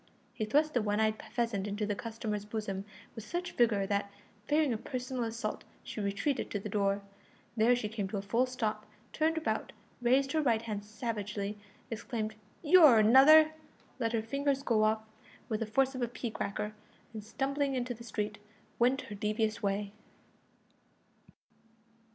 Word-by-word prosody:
He 215 - -2
thrust 300 +7 +2
the 245 - +2
one 210 0 0
eyed 220 0 +1
pheasant 230 -5 -1
into 205 +1 -2
the 205 - -1
customer's 215 +1 -4
bosom 205 -2 -4 0.3
with 225 - -8
such 350 +10 -4
vigour 220 -5 +2
that, 200 0 -1 0.4
fearing 300 -3 +3
a - - -1
personal 250 0 -3
assault, 225 -1 -4 0.2
she 215 - -5
retreated 200 +8 -1
to 205 - -2
the 210 - -6
door. 200 0 0 0.5
There 230 +2 +4
she 240 -3 -2
came 210 -2 -3
to 200 - -4
a 195 - -4
full 235 +5 +1
stop, 215 -4 -3 0.3
turned 320 +1 +1
about, 320 - -2 0.3
raised 265 +3 +3
her 315 - +2
right 230 -6 +2
hand 210 -3 -4
savagely, 210 -2 -4 0.3
exclaimed 220 -1 -3 0.3
"You're 305 -6 +8
another!" 275 +8 +8 0.5
let 230 -1 0
her 225 -1 0
fingers 275 +3 0
go 225 -5 +2
off 220 0 +1 0.5
with 215 -2 -1
the 225 - -2
force 265 +5 +2
of 255 - -5
a 240 - +1
pea 235 0 -5
cracker, 210 +1 -3 0.4
and, 215 -2 -6
stumbling 275 +4 -1
into 250 -1 -2
the 235 0 -11
street, 210 -2 -3 0.4
went 255 +3 +3
her 210 - -9
devious 215 +1 -1
way. 200 0 -1
225 Hz, 165 wpm, -32 LUFS, 210-255 Hz, 0.5 s, You're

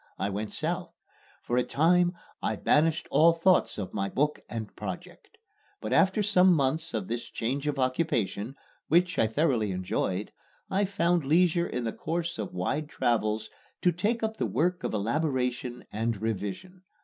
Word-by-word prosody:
I 100 - -1
went 105 +2 -3
South. 175 +2 -3 0.5
For 120 - -1
a 125 - +4
time 175 +5 +3 0.3
I - - 0
banished 160 +1 +2
all 165 +2 +6
thoughts 180 +3 +3
of 95 -3 -5
my 100 -1 -1
book 150 +6 0
and 110 -3 -6
project. 95 -4 -8 0.4
But - - -3
after 195 +3 +4
some 185 -3 +5
months 155 +1 0
of 100 -4 -2
this 120 +1 -3
change 135 +6 -3
of 145 -1 -1
occupation, 130 - 0 0.3
which 175 0 +3
I 110 - +4
thoroughly 120 -3 +1
enjoyed, 95 +1 -2 0.4
I 200 +2 +2
found 175 -3 +1
leisure 170 +4 +3
in 125 - -3
the 115 - -2
course 170 -3 -3
of 105 - -3
wide 145 +12 -2
travels 110 -4 0 0.3
to 180 - +5
take 210 +7 -1
up 220 0 -1
the - - 0
work 175 +3 0
of - - -2
elaboration 125 +1 -1
and 115 0 -1
revision. 110 - -4
140 Hz, 160 wpm, -28 LUFS, 110-170 Hz, 0.5 s, all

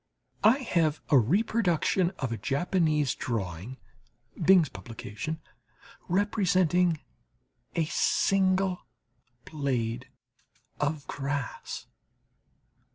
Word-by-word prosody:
I 220 +5 +6
have 165 - +1
the 140 - +7
reproduction 185 - +2
of 130 -3 -3
a 115 - -2
Japanese 150 -1 +1
drawing 105 +1 -4 0.7
(Bing's 180 -2 +6
publication) 115 +6 -6 0.7
representing 180 -4 +2 0.7
a 165 - +2
single 190 +2 +1 0.6
blade 130 -4 -2 0.7
of 150 0 -1
grass. 140 -2 -4
155 Hz, 75 wpm, -28 LUFS, 130-185 Hz, 0.7 s, the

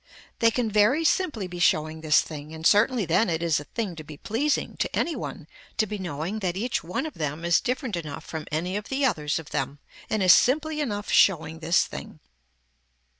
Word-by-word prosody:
They 230 - +5
can 230 -1 -1
very 215 +10 +4
simply 305 - +1
be 180 -1 -7
showing 155 -2 +2
this 155 -1 +4
thing 155 0 -8
and 160 0 -8
certainly 215 +2 +4
then 175 +6 +2
it 165 0 -1
is 165 -3 +2
a 150 - -9
thing 205 -3 -4
to 155 - -7
be 150 -1 -11
pleasing 270 - -1
to - - -2
any 335 - 0
one - - -6 0.3
to 215 - +3
be 210 0 -5
knowing 175 +3 -4
that 185 -3 -2
each 240 +4 -1
one 180 - -3
of 315 - -5
them 155 +2 -4
is 170 -1 +4
different 250 -3 -2
enough 155 -2 -6
from 160 -2 -6
any 175 +5 -2
of 210 - -7
the 275 +1 +1
others 150 - 0
of 160 - -8
them 140 0 -2 0.3
and 215 -3 0
is 185 - +9
simply 305 +4 +2
enough 205 -7 -3
showing 160 -4 +3
this 165 +1 +3
thing. - - -9
185 Hz, 210 wpm, -26 LUFS, 160-230 Hz, 0.3 s, is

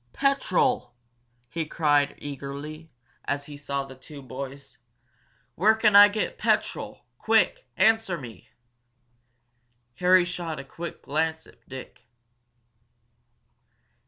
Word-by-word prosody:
"Petrol!" 270 - +1 0.5
he 165 +6 -3
cried 145 -2 +1
eagerly, 145 +3 -7 0.4
as 140 0 -2
he 145 - -9
saw 140 -1 -3
the 135 - -11
two 140 +2 -12
boys. 135 +2 -8 0.7
"Where 210 - +4
can 215 -2 +3
I 205 0 +11
get 215 - -3
petrol? - - -1
Quick! - - +2
Answer 225 -5 +3
me!" 120 -7 -11 1.5
Harry 180 0 +5
shot 170 -4 -4
a - - -6
quick 170 +4 -8
glance 160 +2 -1
at - - -22
Dick. 130 -1 -10
155 Hz, 105 wpm, -26 LUFS, 140-185 Hz, 1.5 s, I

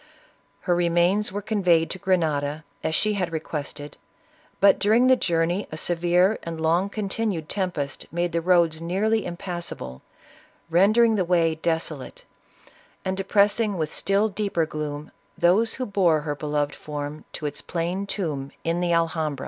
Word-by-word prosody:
Her 180 - +1
remains 175 +4 +2
were 205 +1 -4
conveyed 180 -6 +2
to 190 - -5
Grenada, 155 -5 0 0.2
as 160 - 0
she 215 +4 +2
had 180 -4 -2
requested, 150 -2 -5 0.6
but 200 0 +5
during 220 +5 +4
the 260 0 +6
journey 175 -2 0
a 155 - -5
severe 175 +4 +2
and 165 -1 -6
long 170 +5 +2
continued 200 -5 -2
tempest 170 -8 -3
made 175 +1 -1
the 170 - 0
roads 170 -2 +3
nearly 205 +6 +1
impassa 175 -1 -5
ble, 65 0 -8 0.7
rendering 215 +7 +5
the 200 -4 +1
way 170 -2 +2
desolate, 160 -3 -3 0.8
and 190 0 -1
depressing 200 +2 +2
with 155 -2 -2
still 200 +2 +1
deeper 200 -5 -1
gloom, 150 -1 -5 0.3
those 210 +6 +3
who 255 - -3
bore 180 -7 +2
her 150 -1 -2
beloved 145 0 -1
form 150 0 -6
to 150 - -6
its 145 - -4
plain 180 +4 -3
tomb 155 -9 -3
in 165 +1 0
the 175 -1 +1
Alhambra. 160 -4 0
175 Hz, 150 wpm, -24 LUFS, 160-195 Hz, 0.8 s, the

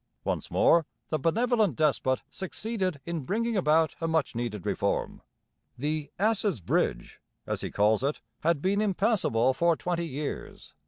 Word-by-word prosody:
Once - - -2
more 165 -2 +4 0.2
the 155 - 0
benevolent 220 - +2
despot 140 -4 +1
succeeded 190 -3 -3
in 170 -1 -2
bringing 225 - -1
about 160 -3 +3
a 165 - 0
much 160 -2 +1
needed 115 -5 -4
reform. - - -1 0.6
The 150 +2 -2
'ass's 205 - +1
bridge,' - - -1 0.3
as - - -2
he - - -3
calls 105 +3 +2
it, 140 +2 0 0.2
had 165 -2 +1
been 200 +2 +2
impassable 195 - +2
for 170 +5 +3
twenty 170 0 -2
years. 145 0 -6
165 Hz, 145 wpm, -28 LUFS, 140-195 Hz, 0.6 s, more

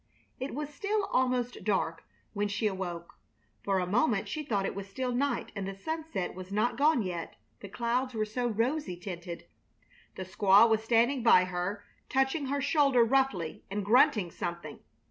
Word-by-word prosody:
It 260 0 -4
was 295 0 -5
still 410 +6 -1
almost 250 -1 0
dark 190 -6 -1 0.3
when 205 -1 0
she 205 +2 -2
awoke. 180 -4 -4 0.4
For 195 -1 +1
a 180 - 0
moment 210 +1 +1
she 310 - -3
thought 205 -9 -1
it - - -2
was 200 0 -7
still 255 +4 -3
night 275 +3 -1
and 195 -1 -4
the 195 - -5
sunset 315 - -4
was 185 +1 -9
not 215 +4 +1
gone 295 -4 +3
yet, 175 -3 -5 0.2
the 200 - -9
clouds 240 +4 -1
were 215 -1 0
so 240 +3 -2
rosy 235 - -1
tinted. 175 -1 -7 0.7
The 190 - -5
squaw 195 +4 +5
was 220 -1 +2
standing 240 +4 +2
by 225 -6 +6
her, 180 +3 -3 0.3
touching 270 +2 +1
her 280 +1 -1
shoulder 280 -3 +4
roughly 230 -9 0
and 200 0 -3
grunting 220 - +4
something. 170 -3 -5
220 Hz, 170 wpm, -30 LUFS, 190-260 Hz, 0.7 s, by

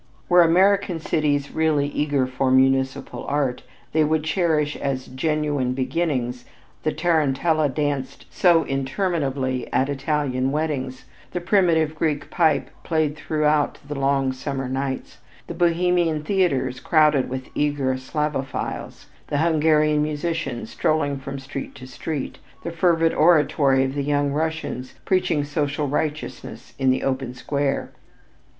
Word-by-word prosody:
Were 175 0 +7
American 185 +1 +3
cities 145 -3 0
really 155 -3 +1
eager 145 -2 0
for 130 +1 -1
municipal 130 0 +2
art, 140 -3 -1 0.3
they 155 0 +3
would 155 0 +1
cherish 155 -2 +1
as 135 -2 -3
genuine 145 -1 -1
beginnings 130 -3 -1 0.4
the 155 - 0
tarentella 155 -1 +1
danced 140 -1 -3
so 170 -3 +4
interminably 135 -2 -1
at 135 - +1
Italian 140 -2 -1
weddings; 135 -4 -2 0.3
the 180 - -1
primitive 170 -4 +2
Greek 155 -2 -2
pipe 160 -4 +2
played 155 -3 0
throughout 150 -1 +1
the 145 - -4
long 135 -1 +1
summer 135 0 -4
nights; 135 +1 -4 0.3
the - - -6
Bohemian 170 -2 +1
theaters 140 -9 0
crowded 150 -4 +3
with 130 0 -5
eager 145 -3 0
Slavophiles; 135 +1 -4 0.2
the 145 - -1
Hungarian 155 -1 +3
musicians 150 -5 -3
strolling 145 -3 0
from 135 +1 -6
street 135 0 -7
to 130 - -10
street; 135 +2 -5 0.2
the 170 - -4
fervid 165 -1 +2
oratory 150 -4 +4
of 135 0 -2
the 145 - -2
young 145 0 +1
Russian 160 -3 -2 0.2
preaching 175 -5 +1
social 145 0 -1
righteousness 150 +2 -4
in 135 -1 +3
the 130 - +1
open 130 -2 -2
square. 140 +1 -2
145 Hz, 130 wpm, -23 LUFS, 135-160 Hz, 0.4 s, Were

